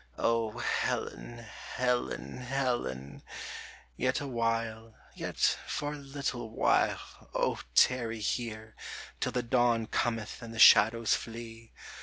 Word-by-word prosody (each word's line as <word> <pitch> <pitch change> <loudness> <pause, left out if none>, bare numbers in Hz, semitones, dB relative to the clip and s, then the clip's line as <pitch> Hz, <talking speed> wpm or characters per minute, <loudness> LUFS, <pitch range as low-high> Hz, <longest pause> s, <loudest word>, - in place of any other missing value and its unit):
O 115 -1 +1
Helen! 120 0 -2 0.4
Helen! 120 - -1
Helen! 125 - -2 0.7
yet 130 - +1
awhile, 115 -4 -2 0.2
Yet - - -6 0.3
for 145 0 -2
a - - -6
little 135 -4 -4
while, 110 - 0
O - - +1 0.2
tarry 115 -3 +4
here, 110 0 -3 0.4
Till - - 0
the 125 - -1
dawn 120 -1 +2
cometh 115 0 -2
and 115 -1 -8
the - - -7
shadows 115 0 +7
flee 115 0 -6
115 Hz, 110 wpm, -31 LUFS, 110-125 Hz, 0.7 s, shadows